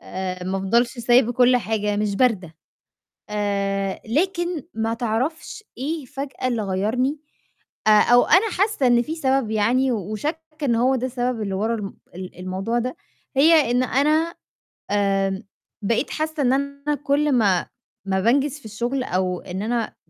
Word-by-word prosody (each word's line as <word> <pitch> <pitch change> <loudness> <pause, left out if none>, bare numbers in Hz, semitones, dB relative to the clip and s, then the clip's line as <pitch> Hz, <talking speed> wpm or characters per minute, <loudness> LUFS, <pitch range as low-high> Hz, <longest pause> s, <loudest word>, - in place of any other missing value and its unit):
آآ 185 -1 -5
ما 190 +1 -2
أفضلش 235 +6 +1
سايبة 240 0 +4
كلّ 250 0 +5
حاجة، 210 -3 -1
مش 210 -1 0
باردة. 200 -10 +1 0.8
آآ 200 -2 -1
لكن 345 - -1
ما 225 0 -1
تعرفش 255 - -3
إيه 295 +3 -3
فجأة 270 -1 -5
اللي 235 -3 -1
غيّرني، 220 +9 0 0.7
آآ - - +7
أو 245 0 +5
أنا 415 +3 +4
حاسّة 390 - +1
إن 240 -1 +5
في 310 +6 -4
سبب 270 -7 0
يعني 245 +5 +2
و 210 -3 -3
وشاكّه 305 - -3 0.2
إن 240 -4 +2
هو 255 +3 +3
ده 255 - -1
السبب 245 -2 -2
اللي 200 -2 -2
ورا 220 +4 0
الم 205 -3 -6 0.2
ال 185 -1 -8
الموضوع 190 +6 -2
ده، 255 +6 -3 0.4
هي 305 -2 +5
إنه 255 +2 +2
أنا 315 +3 +2 0.6
آمم 195 -1 +1 0.4
بقيت 230 +7 0
حاسّة 310 -1 -2
إن 250 0 +3
أنا 280 +2 -1
كلّ 285 +1 +2
ما 200 -8 +2 0.4
ما 190 -1 0
بانجِز 275 +6 +2
في - - -21
الشُغل، 240 +5 -2
أو 180 -3 -1
إن 185 +1 -6
أنا 230 0 -2
240 Hz, 160 wpm, -22 LUFS, 205-275 Hz, 0.8 s, آآ